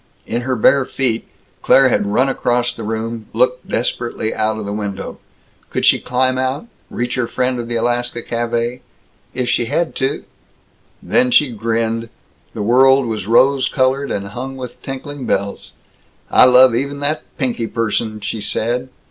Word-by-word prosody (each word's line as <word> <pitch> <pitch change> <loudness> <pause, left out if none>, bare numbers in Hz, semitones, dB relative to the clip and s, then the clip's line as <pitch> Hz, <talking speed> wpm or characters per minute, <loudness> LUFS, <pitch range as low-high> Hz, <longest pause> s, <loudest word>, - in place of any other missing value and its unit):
In 120 +2 -2
her 130 +1 -1
bare 135 +4 +4
feet, 125 -3 -2 0.3
Claire 135 -1 +5
had 105 - +1
run 115 +6 +2
across 125 -2 0
the 115 - -9
room, 110 0 -4
looked 125 +2 +1
desperately 120 -1 -2
out 110 0 0
of 110 - -5
the 100 - -4
window. 100 -2 -5 0.5
Could - - -1
she - - +5
climb 130 +1 0
out, 130 - -1 0.2
reach 120 +1 -3
her 125 -2 -1
friend 125 0 -1
of 120 - -4
the 120 - -3
Alaska 120 0 -1
Café? 120 +1 -2 0.6
If 125 -1 -1
she 120 - +1
had 155 +7 -1
to 135 +2 -1 0.8
Then 125 - +2
she 130 +1 +4
grinned. 115 +1 -1 0.5
The 105 - -2
world 130 +4 +5
was 110 -4 -3
rose 130 +4 +4
colored 135 +1 +1
and 100 0 -3
hung 130 +5 -6
with 125 -2 -8
tinkling 135 0 -6
bells. 100 0 -2 0.6
"I - - +7
love 125 0 +7
even 140 +4 -2
that 150 +2 0 0.2
Pinky 120 -4 -1
person!" 110 -1 -2
she 110 +1 -4
said. 120 +5 -1
120 Hz, 165 wpm, -18 LUFS, 115-130 Hz, 0.8 s, I